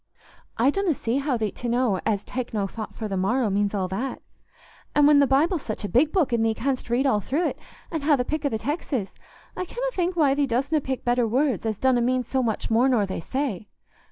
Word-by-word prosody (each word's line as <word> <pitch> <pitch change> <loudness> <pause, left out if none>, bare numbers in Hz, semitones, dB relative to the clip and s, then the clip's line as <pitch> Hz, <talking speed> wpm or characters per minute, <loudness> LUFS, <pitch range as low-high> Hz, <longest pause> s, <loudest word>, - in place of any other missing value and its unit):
I 255 +5 +4
donna 385 -3 0
see 235 +3 -1
how 275 -3 0
thee't 215 -3 -2
to 240 - -3
know 240 -5 +1
as 205 -3 0
'take 245 0 -5
no 205 -2 +1
thought 215 +2 -7
for 220 - -4
the 195 - -3
morrow' 215 +4 +1
means 205 +1 0
all 190 -2 0
that. 240 +8 -3 0.8
An' 295 - +5
when 295 -1 +6
the 280 - +5
Bible's 305 +5 +2
such 215 -4 -5
a - - -1
big 275 +8 +3
book, 320 -10 +1
an' 235 - +2
thee 225 0 +1
canst 260 0 -2
read 245 +4 +1
all 260 -6 +3
thro't, 290 - -1 0.4
an' 320 -2 -2
ha' 295 +1 +4
the 250 - -1
pick 310 +2 -2
o' 285 - +2
the 220 - -1
texes, 255 - -3 0.4
I - - -2
canna 485 +7 -5
think 360 0 -1
why 295 -5 +4
thee 285 0 +1
dostna 275 +6 0
pick 265 -1 -4
better 240 -1 +2
words 250 -2 0
as 215 -2 -2
donna 255 0 +2
mean 250 +1 +1
so 260 +3 -1
much 225 -2 -2
more 240 +4 +4
nor 230 -6 +3
they 190 - -4
say. 230 - -3
255 Hz, 240 wpm, -25 LUFS, 220-285 Hz, 0.8 s, when